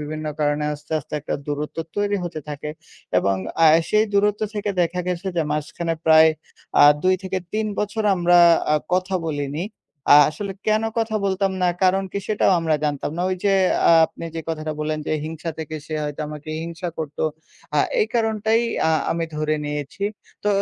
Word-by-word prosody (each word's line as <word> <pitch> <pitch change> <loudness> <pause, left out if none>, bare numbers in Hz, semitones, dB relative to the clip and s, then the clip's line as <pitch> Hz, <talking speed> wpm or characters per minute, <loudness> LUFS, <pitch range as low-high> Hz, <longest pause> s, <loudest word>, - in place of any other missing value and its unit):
বিভিন্ন 155 +1 -5
কারণে 145 0 +1
আস্তে, 150 +1 -11
আস্তে, 145 - -13
একটা 150 - -3
দূরত্ব 150 +1 -4 0.2
তৈরি 205 0 +1
হতে 165 -3 -5
থাকে। 150 +1 -5 0.5
এবং 100 0 +1 0.3
আ - - +8 0.2
সেই 215 +1 +4
দূরত্ব 205 +1 +2
থেকে 205 0 -2
দেখা 175 +1 -1
গেছে 180 +1 -3
যে 165 - +3
মাঝখানে 165 +3 -2
প্রায় 160 0 +7 0.5
আ - - +10 0.2
২-৩ 185 +2 -1
বছর 210 +1 -1
আমরা 175 -1 +4 0.3
আ - - +5 0.2
কথা 185 +1 +1
বলিনি। 145 +1 -3 0.5
আ - - +10
আসলে 195 +6 -5
কেন 215 0 +3 0.2
কথা 220 -1 0
বলতাম 195 0 0
না, 180 - +4 0.2
কারণ 190 +1 +3
কি 200 - -1
সেটাও 210 -2 +2
আমরা 160 -2 +1
জানতাম 145 -1 -1
না। 175 - -1
ওই 185 - -1
যে 200 - +4 0.4
আ - - +7
আপনি - - -10
যে 165 - -3
কথাটা 155 -1 -3
বললেন 155 0 -1
যে - - -1
হিংসা 160 +1 -5
থেকে, 155 0 -5
সে 155 - -4
হয়তো 145 0 -5
আমাকে 150 0 -9
হিংসা 170 +1 -5
করতো, 155 -2 -4 0.5
আ - - +4 0.2
এই 430 - +3
কারণটাই 220 -1 +2 0.3
আ - - +3 0.2
আমি 165 0 0
ধরে 155 0 0
নিয়েছি। 150 +6 -4 0.4
তো - - +2
170 Hz, 180 wpm, -22 LUFS, 150-195 Hz, 0.5 s, আ